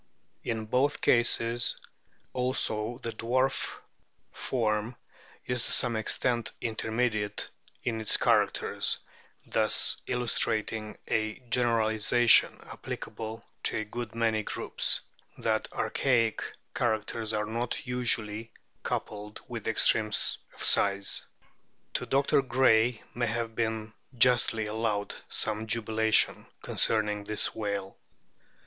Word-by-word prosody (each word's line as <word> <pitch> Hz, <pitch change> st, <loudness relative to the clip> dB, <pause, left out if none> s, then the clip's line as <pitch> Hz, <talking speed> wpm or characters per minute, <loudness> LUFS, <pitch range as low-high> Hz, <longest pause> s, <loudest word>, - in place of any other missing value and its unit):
In 110 Hz, -2 st, -3 dB
both 130 Hz, +6 st, +1 dB
cases 120 Hz, 0 st, +3 dB, 0.6 s
also 120 Hz, -3 st, +1 dB
the 115 Hz, -, -3 dB
dwarf 125 Hz, +4 st, -1 dB, 0.6 s
form 110 Hz, -1 st, -1 dB, 0.5 s
is 125 Hz, -1 st, -2 dB
to -, -, -6 dB
some 120 Hz, -2 st, +1 dB
extent 120 Hz, +2 st, 0 dB
intermediate 110 Hz, -2 st, -2 dB, 0.3 s
in 115 Hz, -2 st, -2 dB
its 110 Hz, -, +3 dB
characters, -, -, +2 dB, 0.5 s
thus 110 Hz, -1 st, +2 dB
illustrating 110 Hz, -3 st, 0 dB
a 110 Hz, -1 st, 0 dB, 0.2 s
generalisation 115 Hz, -1 st, +3 dB
applicable 110 Hz, +1 st, -7 dB, 0.2 s
to -, -, 0 dB
a 110 Hz, -, -1 dB
good 115 Hz, +2 st, -6 dB
many 115 Hz, -2 st, +1 dB
groups -, -, -1 dB, 0.4 s
that -, -, -1 dB
archaic 115 Hz, -5 st, +1 dB, 0.3 s
characters 110 Hz, -1 st, -1 dB
are 105 Hz, -1 st, -1 dB
not 115 Hz, +2 st, -3 dB
usually 115 Hz, -3 st, 0 dB, 0.3 s
coupled 105 Hz, 0 st, -5 dB
with 115 Hz, -3 st, -6 dB
extremes 110 Hz, -1 st, +3 dB, 0.2 s
of -, -, -7 dB
size. 100 Hz, 0 st, +3 dB, 0.7 s
To -, -, -2 dB
Dr. 140 Hz, 0 st, +3 dB
Gray 120 Hz, -3 st, +3 dB
may 120 Hz, 0 st, -1 dB
have 115 Hz, 0 st, -3 dB
been 110 Hz, -1 st, -2 dB, 0.2 s
justly 115 Hz, -2 st, +3 dB
allowed 105 Hz, -1 st, -2 dB, 0.2 s
some 110 Hz, 0 st, 0 dB
jubilation 110 Hz, -1 st, +2 dB, 0.2 s
concerning 105 Hz, -2 st, +2 dB
this 105 Hz, 0 st, 0 dB
whale. 100 Hz, -3 st, -4 dB
110 Hz, 105 wpm, -29 LUFS, 110-120 Hz, 0.7 s, cases